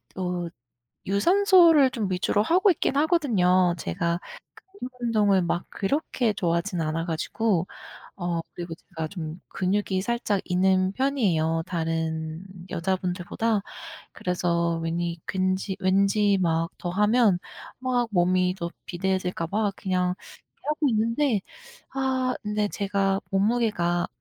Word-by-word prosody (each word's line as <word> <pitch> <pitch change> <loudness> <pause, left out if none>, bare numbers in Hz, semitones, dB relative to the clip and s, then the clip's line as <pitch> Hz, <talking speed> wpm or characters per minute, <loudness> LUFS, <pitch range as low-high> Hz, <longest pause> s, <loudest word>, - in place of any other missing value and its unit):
또 180 -2 -3 0.6
유산소를 335 - +5
좀 215 -6 -2
위주로 195 +3 +1
하고 370 - +4
있긴 285 -4 -1
하거든요. 190 - +3
제가 170 - -1 0.5
근육 380 -10 -8
운동을 210 -5 +3
막 175 +1 -1
그렇게 240 0 -1
좋아하지는 170 -1 -1
않아 165 +2 -2
가지고 180 +3 0 0.5
어 175 -2 -2
그리고 170 -1 -6
제가 160 -1 -7
좀 165 -3 -6
근육이 190 0 0
살짝 215 -3 0
있는 185 +1 +2
편이에요, 185 - +1
다른 160 0 -2 0.3
여자분들보다. 185 +4 -1 0.5
그래서 170 -2 0
왜니 170 +1 -2
괜지 185 +1 -1
왠지 200 +1 +3
막 165 -1 +1
더 175 - -4
하면 210 0 +3 0.4
막 250 -2 +1
몸이 180 0 +2
더 170 -1 -4 0.2
비대해질까 180 -2 -1
봐 205 0 0
그냥 180 -1 0 0.5
하고 300 -1 +1
있는데 230 +1 +1 0.5
아 260 -1 0
근데 210 0 0
제가 195 -1 0
몸무게가 195 -4 +1
190 Hz, 255 characters per minute, -25 LUFS, 175-220 Hz, 0.6 s, 유산소를